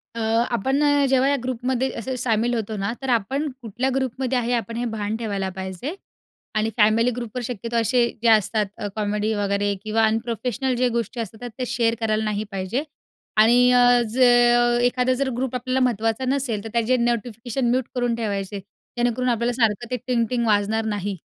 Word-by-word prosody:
अ, - - -4 0.4
आपण 265 +5 0
ना 290 -1 +3
जेव्हा 265 +1 +3
या 285 - +3
ग्रुपमध्ये 255 +1 -1
असे 255 +3 -4
शामील 235 -1 +1
होतो 220 -2 -2
ना, 200 +1 -1
तर 265 - -4
आपण 260 +6 0
कुठल्या 245 +3 -2
ग्रुपमध्ये 260 -1 -1
आहे 240 0 -1
आपण 230 -1 -2
हे 240 - -1
भान 220 -2 -3
ठेवायला 200 -4 -2
पाहिजे. 190 - -5 0.6
आणि, 215 +1 +1
फॅमिली 225 +3 +4
ग्रुपवर 240 0 -5
शक्यतो 235 0 -5
असे 235 +2 +3 0.2
जे - - +3
असतात 215 0 +3
अ, 205 - -4
कॉमेडी 210 0 -1
वगैरे 205 0 0
किंवा 220 +1 +1
अनप्रोफेशनल 235 +3 -1
जे 250 - +3
गोष्टी 235 0 -3
असतात 225 +2 -6
त्या 250 +3 -5
शेअर 230 -1 +1
करायला 220 -1 0
नाही 210 -1 -1
पाहिजे. 195 +8 -2 0.5
आणि 240 +3 +6
अ, 245 0 +5
ज 230 - -6 0.7
एखादा 250 +1 +1
जर 265 +1 -1
ग्रुप 255 0 -2
आपल्याला 255 +1 -1
महत्त्वाचा 225 +1 0
नसेल 255 -6 -1
तर 225 - -6
त्याचे 235 +2 +2
नोटिफिकेशन 240 +1 -1
म्यूट 255 0 +1
करून 245 -2 0
ठेवायचे 200 -3 -3 0.4
जेणेकरून 245 +1 +1
आपल्याला 235 +1 0
सारखं 225 +1 +1
ते 250 - 0
टिंग-टिंग 235 -1 0
वाजणार 215 +1 +1
नाही. 205 -2 -3
235 Hz, 175 wpm, -23 LUFS, 215-250 Hz, 0.7 s, आणि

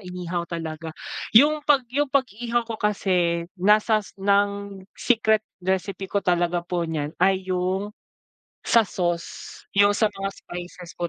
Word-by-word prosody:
inihaw 180 -2 -5
talaga. 160 -1 -6 0.4
Yung 300 +5 +6
pag 290 -3 +3
yung 290 +1 +1
pag-ihaw 240 -3 0
ko 225 -1 -6
kasi, 180 -5 +1 0.2
nasas 210 +1 +2
ng 200 0 0 0.2
secret 220 -3 +2 0.2
recipe 190 +1 -2
ko 200 0 -1
talaga 175 -1 +1
po 175 -1 -2
niyan, 150 -2 -3
ay 190 -1 +3
yung, 185 +3 -1 0.8
sa 230 - +6
sauce, 175 -3 -4
yung 200 +1 +4
sa 215 0 +2
mga 195 0 -3
spices 175 0 -9
po 175 -1 -1
195 Hz, 135 wpm, -24 LUFS, 175-215 Hz, 0.8 s, Yung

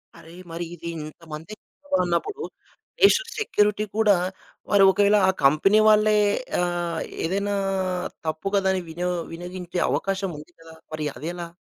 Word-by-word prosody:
అరే! 165 +1 -14 0.2
మరి 170 +1 -4
ఇది 170 0 -7 0.2
ఇంతమంది 160 +4 -9 0.4
జనాభా 280 - +2
ఉన్నప్పుడు, 400 - -2 0.6
నేషనల్ 460 +4 +4
సెక్యూరిటీ 210 - +1
కూడా 210 -3 +5 0.6
మరి 200 -1 +6
ఒకవేళ 205 +1 +4
ఆ - - +5
కంపెనీ 155 +10 +5
వాళ్ళే 215 0 +5 0.4
ఆహ్, 175 -2 -1 0.3
ఏదైనా 200 +4 -1 0.7
తప్పు 155 +5 -3
కథని 190 -1 +2
వినో 175 +2 -2 0.2
వినియోగించే 175 +1 -5
అవకాశం 195 -1 -1
ఉంది 155 +3 -14
కదా! 165 0 -13 0.2
మరి 155 -1 -3
అదెలా? 170 +5 -5
180 Hz, 130 wpm, -24 LUFS, 165-205 Hz, 0.7 s, మరి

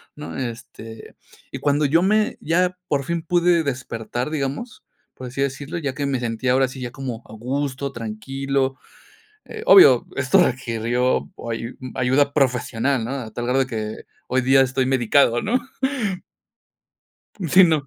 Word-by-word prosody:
¿no? 150 0 -8
Este, 115 -2 -8 0.4
y - - -5
cuando 145 +1 +1
yo 165 +5 +3
me 210 +3 +2
ya 180 +3 +1
por 140 -2 0
fin 170 +1 -2
pude 175 0 +2
despertar, 125 -1 -4
digamos, 145 - -4 0.3
por 130 - -8
así 130 +2 -4
decirlo, 140 +4 -3
ya 140 -5 -3
que 145 +2 -3
me 135 -3 -1
sentía 120 +1 -1
ahora 135 0 +3
sí 130 +1 -9
ya 120 -1 -5
como 125 -3 -6
a 110 - -13
gusto, 135 +4 -3
tranquilo. 135 +4 -2 0.9
Obvio, 405 -4 +8
esto 195 -2 +4
requirió 120 0 -1 0.2
ayu 115 +1 -5 0.2
ayuda 135 +3 +2
profesional, 125 -2 +1
¿no? 120 - -4
A 120 -5 -6
tal 120 +2 -4
grado 130 +2 +1
de 130 - +1
que 110 -3 -4 0.3
hoy 130 +1 +1
día 135 +1 +5
estoy 130 0 +1
medicado, 120 -1 +3
¿no? 245 +3 0 1.9
Sí, 185 +3 +7
no. 155 -5 +1
135 Hz, 150 wpm, -22 LUFS, 120-145 Hz, 1.9 s, Obvio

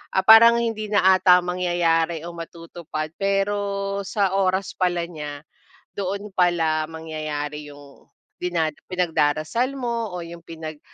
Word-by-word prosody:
ah, 190 - +3
parang 230 +2 +9
hindi 225 -2 -2
na 205 -3 +2
ata 180 -1 +6
mangyayari 170 -2 0
o 175 - -6
matutupad, 165 -2 -7
pero 200 0 -1
sa 195 -2 0
oras 190 0 +1
pala 175 -2 0
niya, 150 -4 -8 0.6
doon 200 +2 -3
pala 165 -4 +1
mangyayari 155 -2 -5
yung 145 -1 -17 0.3
dina 170 -3 0 0.2
pinagdarasal 180 - 0
mo 235 -3 -2
o 175 - -5
yung 170 0 -9
pinag, 160 -2 -8
175 Hz, 125 wpm, -23 LUFS, 160-200 Hz, 0.6 s, parang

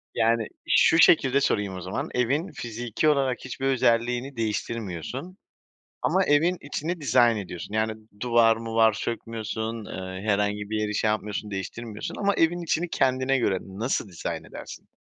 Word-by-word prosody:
Yani 115 -1 +2 0.2
şu 160 - +5
şekilde 140 -5 +5
sorayım 100 -7 0
o 90 - -6
zaman 95 +3 -4
evin 140 +9 0
fiziki 120 0 -2
olarak 135 -4 +2
hiçbir 130 +1 -5
özelliğini 125 +1 +1
değiştirmiyorsun 115 - -4 0.6
ama 190 - +2
evin 165 +5 +3
içini 160 +4 -4
dizayn 120 -5 +4
ediyorsun. 95 0 -7
Yani 110 0 +1 0.3
duvar 115 -1 +4
muvar 115 -1 +3
sökmüyorsun. 110 0 -4
Eee, 95 0 -6
herhangi 105 0 0
bir 110 0 -1
yeri 105 -1 -1
şey 110 - +1
yapmıyorsun 105 -1 -3
değiştirmiyorsun. 105 +3 -5
Ama 200 -1 +2
evin 170 +2 +2
içini 170 +1 0
kendine 130 -1 +2
göre 100 -6 +1
nasıl 105 +3 -2
dizayn 85 - -5
edersin? - - -10
115 Hz, 145 wpm, -26 LUFS, 105-135 Hz, 0.6 s, şu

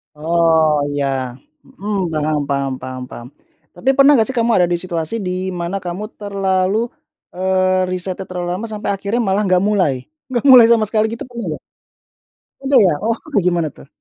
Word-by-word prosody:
Oh 160 -1 +2
iya, 145 -1 -1 0.6
mhm, 205 -8 -4
paham 155 -1 0
paham 140 -1 -1
paham 130 0 -6
paham. 120 - -9 0.5
Tapi 175 +9 -1
pernah 275 +1 +6
nggak 225 -5 +3
sih 265 - -5
kamu 235 0 +2
ada 175 - +4
di 175 - 0
situasi 170 +1 -3
di 180 - -2 0.2
mana 175 +3 -3
kamu 175 +4 -4 0.2
terlalu 195 -1 0 0.6
eee, 185 0 +1
risetnya 185 +1 -4
terlalu 180 -1 -4
lama 185 +6 -3
sampai 215 -1 -5
akhirnya 200 +4 -1
malah 200 0 +1
nggak 185 0 +3
mulai? 200 -8 +2 0.4
Nggak 245 -2 -1
mulai 245 -3 +10
sama 230 -1 +4
sekali 215 -1 +2
gitu - - -7
pernah 235 -3 -6
nggak? - - -13 1.0
Udah 270 -1 +3
ya? 185 - +4
Oh 230 +1 +1 0.2
kayak 205 -10 +2
gimana 170 -3 +1
tuh? - - -16
185 Hz, 175 wpm, -18 LUFS, 170-215 Hz, 1.0 s, mulai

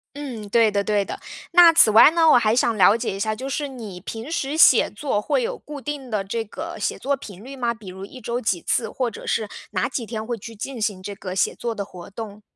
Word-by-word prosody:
嗯， 255 -8 -6
对 225 +1 +4
的 200 -1 0
对 205 -1 +1
的。 - - -7 0.3
那 340 -1 +8
此 320 - +7
外 220 +7 +8
呢 325 -1 +4
我 - - +7
还 225 -2 +2
想 235 -2 +2
了 195 +2 +6
解 230 -4 -3
一 - - -7
下， 215 +2 0
就 260 +5 -6
是 290 +1 -2
你 225 -9 -8
平 225 - -7
时 290 -3 -2
写 275 -6 +6
作 210 0 -2
会 355 - 0
有 485 0 -3
固 295 -2 -9
定 290 -2 -5
的 210 -2 0
这 225 +4 -3
个 325 +10 -7
写 - - -2
作 280 +1 -1
频 205 -6 -11
率 270 +3 -9
吗？ 240 -3 -1
比 225 -4 -15
如 190 +1 -8
1 255 +5 -12
周 235 +2 -2
几 210 -8 -1
次。 - - 0
或 255 -2 -1
者 225 - -10
是 220 -2 -1 0.2
哪 185 -3 0
几 255 -3 -4
天 220 -1 -5
会 240 0 -3
去 225 +2 -10
进 245 +4 -6
行 205 -3 -1
这 200 +1 -6
个 185 -1 -6
写 190 - +1
作 235 -1 -3
的 205 - -4
活 180 -2 -11
动？ 210 0 -8
230 Hz, 270 characters per minute, -23 LUFS, 205-270 Hz, 0.3 s, 那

